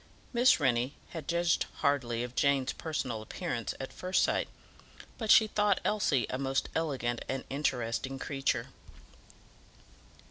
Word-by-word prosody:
Miss 245 -3 +5
Rennie 130 -1 +1
had 160 -4 -7
judged 170 0 +1
hardly 120 -5 +1
of 125 0 -6
Jane's 135 -1 +2
personal 130 -8 -3
appearance 115 +1 -4
at 135 - -6
first 185 +1 +1
sight, - - +1 0.7
but 220 -2 -3
she 220 - +8
thought 210 -2 +2
Elsie 160 - +2
a 130 - -2
most 135 0 0
elegant 130 -7 -1
and 135 0 -2
interesting 135 -2 -1
creature. 135 0 -1
135 Hz, 130 wpm, -31 LUFS, 125-170 Hz, 0.7 s, she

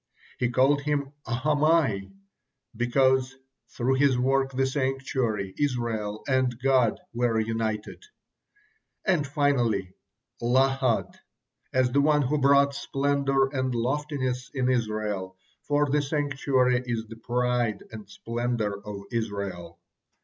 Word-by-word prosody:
He 125 - +1
called 135 +4 +3
him 145 -1 -2
Ahamai, 140 -5 +1 0.6
because, 130 +2 +2 0.3
through 125 +2 0
his 140 -3 +4
work, 135 +1 +1
the 135 0 +1
sanctuary, 130 -7 -1
Israel, 115 -7 -2
and 130 -3 +1
God 130 -4 +2
were 120 -1 +1
united; 110 - -3 1.0
and 170 -8 +2
finally 120 -10 +1 0.5
Lahad, 130 0 +1 0.5
as 130 -1 +2
the 140 +2 +3
one 150 0 +3
who 145 +3 0
brought 140 +1 +5
splendor 140 -1 +1
and 130 -2 -1
loftiness 130 0 -2
it 130 -2 +1
Israel, 105 -6 -1 0.3
for 145 0 +2
the 145 +1 +2
sanctuary 135 -3 +1
is 115 -2 -3
the 115 0 -11
pride 120 -1 -1
and 105 -3 -10
splendor 115 -1 -3
of 100 -1 -7
Israel. 100 -7 -4
125 Hz, 115 wpm, -26 LUFS, 115-140 Hz, 1.0 s, brought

